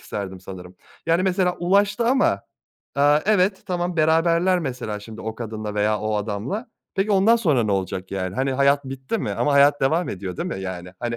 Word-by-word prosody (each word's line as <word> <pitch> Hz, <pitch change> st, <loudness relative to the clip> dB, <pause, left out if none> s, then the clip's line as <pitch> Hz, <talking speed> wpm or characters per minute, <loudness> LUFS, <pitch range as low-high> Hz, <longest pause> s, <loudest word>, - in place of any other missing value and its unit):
isterdim 95 Hz, -2 st, -6 dB
sanırım. 90 Hz, -1 st, -10 dB, 0.3 s
Yani, 165 Hz, +2 st, +3 dB
mesela 185 Hz, -1 st, +1 dB
ulaştı 200 Hz, +6 st, +2 dB
ama, 260 Hz, +2 st, +2 dB, 0.5 s
aaa, 145 Hz, +2 st, +4 dB
evet, 195 Hz, -2 st, +2 dB
tamam, 175 Hz, -1 st, -2 dB
beraberler 165 Hz, +3 st, +3 dB
mesela 125 Hz, -9 st, -4 dB
şimdi 110 Hz, +1 st, -10 dB
o 110 Hz, 0 st, -5 dB
kadınla 110 Hz, -2 st, -5 dB
veya 105 Hz, +1 st, +1 dB
o 110 Hz, 0 st, -1 dB
adamla. 110 Hz, -, -3 dB, 0.3 s
Peki 200 Hz, +2 st, 0 dB
ondan 205 Hz, +4 st, +5 dB
sonra 155 Hz, -, +2 dB
ne 105 Hz, -, 0 dB
olacak, 95 Hz, -1 st, -3 dB
yani, 95 Hz, -1 st, -3 dB
hani, 135 Hz, +1 st, 0 dB
hayat 140 Hz, +1 st, +3 dB
bitti 135 Hz, +10 st, -4 dB
mi? -, -, -3 dB
Ama 145 Hz, -, 0 dB
hayat 145 Hz, +1 st, +5 dB
devam 160 Hz, +6 st, +1 dB
ediyor, 95 Hz, -2 st, -5 dB
değil -, -, -3 dB
mi, 95 Hz, -, -4 dB
yani? 90 Hz, -1 st, -6 dB
Hani, 120 Hz, -1 st, -2 dB
135 Hz, 190 wpm, -23 LUFS, -, 0.5 s, ondan